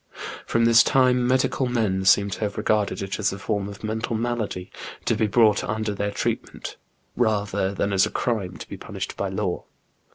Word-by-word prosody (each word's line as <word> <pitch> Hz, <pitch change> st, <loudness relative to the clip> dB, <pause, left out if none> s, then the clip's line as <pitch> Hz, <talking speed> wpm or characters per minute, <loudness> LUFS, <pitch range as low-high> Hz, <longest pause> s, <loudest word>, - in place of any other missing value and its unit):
From 115 Hz, 0 st, +2 dB
this 115 Hz, 0 st, +7 dB
time 125 Hz, -1 st, +3 dB
medical 130 Hz, +1 st, +1 dB
men 105 Hz, -6 st, 0 dB
seem 100 Hz, +1 st, +5 dB
to -, -, -4 dB
have 105 Hz, -2 st, -2 dB
regarded 105 Hz, -2 st, 0 dB
it 95 Hz, +2 st, -4 dB
as 100 Hz, -2 st, +1 dB
a 100 Hz, -, -5 dB
form 100 Hz, 0 st, -2 dB
of 100 Hz, +1 st, -11 dB
mental 110 Hz, +1 st, -2 dB
malady 110 Hz, -5 st, -3 dB, 0.3 s
to -, -, +2 dB
be 110 Hz, -, +1 dB
brought 105 Hz, 0 st, +4 dB
under 110 Hz, 0 st, -2 dB
their 100 Hz, +1 st, -2 dB
treatment, 100 Hz, -, -3 dB, 0.4 s
rather 105 Hz, -4 st, +1 dB
than 100 Hz, 0 st, -1 dB
as 95 Hz, 0 st, +4 dB
a -, -, -5 dB
crime 105 Hz, -7 st, -2 dB
to -, -, -9 dB
be -, -, -7 dB
punished -, -, -6 dB
by -, -, -2 dB
law. -, -, -2 dB
105 Hz, 190 wpm, -24 LUFS, 100-115 Hz, 0.4 s, this